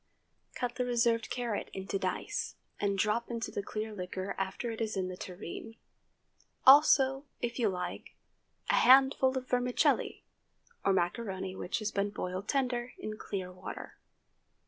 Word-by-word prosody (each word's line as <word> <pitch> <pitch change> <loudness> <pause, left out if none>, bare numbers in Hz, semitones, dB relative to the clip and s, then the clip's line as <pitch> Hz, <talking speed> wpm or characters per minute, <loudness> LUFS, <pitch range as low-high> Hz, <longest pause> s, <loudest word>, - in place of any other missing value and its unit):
Cut 245 -1 -3
the 250 - +1
reserved 235 -2 +2
carrot 240 -4 -2
into 195 +1 -3
dice 190 - -2 0.2
and 200 -1 0
drop 215 +4 +1
into 230 -1 -3
the - - -2
clear 215 +2 -4
liquor 185 0 -4
after 195 +5 -3
it 225 - -6
is 215 -3 -1
in 185 -1 -1
the 185 - -5
tureen,—also, 265 - +2
if 240 +1 -3
you 225 -3 +3
like, 180 -1 -5 0.6
a - - +4
handful 265 0 +6
of 255 0 -4
vermicelli, 250 0 +1 0.6
or 195 - +3
macaroni 190 +1 -1
which 180 - -2
has 215 -1 -2
been 200 0 0
boiled 185 -1 -4
tender 250 -3 0
in 215 0 -5
clear 185 -3 -4
water. 180 - -8
220 Hz, 145 wpm, -31 LUFS, 190-245 Hz, 0.6 s, handful